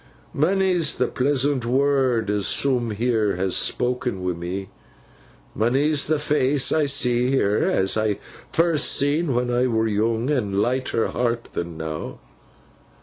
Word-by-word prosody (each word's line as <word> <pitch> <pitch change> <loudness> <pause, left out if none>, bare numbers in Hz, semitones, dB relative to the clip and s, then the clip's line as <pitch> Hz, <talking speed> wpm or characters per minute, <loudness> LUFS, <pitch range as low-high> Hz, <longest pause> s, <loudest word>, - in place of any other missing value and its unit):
'Monny's 180 0 +1
the 125 - +1
pleasant 135 0 0
word 130 -3 +1
as 105 -2 -1
soom 125 -4 0
heer 110 -2 0
has 95 +1 -1
spok'n 125 -6 -1
wi' 90 -1 -1
me; 90 +3 -6 0.8
monny's 140 +6 +1
the 155 +1 +2
face 145 -2 +1
I 155 -2 +2
see 125 -3 +2
heer, 105 -6 +1
as 95 0 +1
I 110 -2 0 0.3
first 165 -2 +2
seen 145 0 +1
when 125 0 0
I 125 +1 +2
were 110 -2 0
yoong 110 +5 0
and 100 -6 -1
lighter 125 0 0
heart'n 120 -1 -2
than 85 -1 -5
now. 80 -1 -6
125 Hz, 140 wpm, -23 LUFS, 105-140 Hz, 0.8 s, the